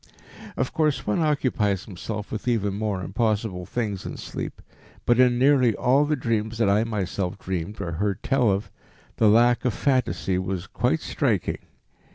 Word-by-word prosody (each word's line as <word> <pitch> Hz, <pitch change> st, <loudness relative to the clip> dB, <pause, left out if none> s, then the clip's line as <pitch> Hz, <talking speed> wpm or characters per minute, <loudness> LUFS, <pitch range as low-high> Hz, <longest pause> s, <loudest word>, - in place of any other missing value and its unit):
Of 130 Hz, -, -1 dB
course 155 Hz, -3 st, +1 dB
one 105 Hz, -, 0 dB
occupies 125 Hz, -, +1 dB
himself 105 Hz, +2 st, -6 dB
with 110 Hz, -, -5 dB
even 105 Hz, -5 st, +1 dB
more 100 Hz, -2 st, -2 dB
impossible 105 Hz, -3 st, -1 dB
things 105 Hz, -6 st, -3 dB
in -, -, -6 dB
sleep, -, -, -6 dB, 0.5 s
but 120 Hz, 0 st, +3 dB
in 125 Hz, -1 st, +5 dB
nearly 130 Hz, -4 st, +4 dB
all 135 Hz, +4 st, +3 dB
the 150 Hz, +1 st, +1 dB
dreams 115 Hz, -3 st, -1 dB
that 115 Hz, -2 st, +2 dB
I 100 Hz, +2 st, +3 dB
myself 95 Hz, -4 st, -2 dB
dreamed 95 Hz, +2 st, -4 dB
or 95 Hz, -4 st, -3 dB
heard 100 Hz, +4 st, -2 dB
tell 135 Hz, -4 st, +2 dB
of, 100 Hz, +2 st, -1 dB, 0.5 s
the 110 Hz, -, +5 dB
lack 120 Hz, +2 st, +4 dB
of 125 Hz, -5 st, 0 dB
phantasy 95 Hz, -, 0 dB
was 95 Hz, -1 st, -3 dB
quite -, -, 0 dB
striking. -, -, -1 dB
110 Hz, 165 wpm, -25 LUFS, 95-125 Hz, 0.5 s, in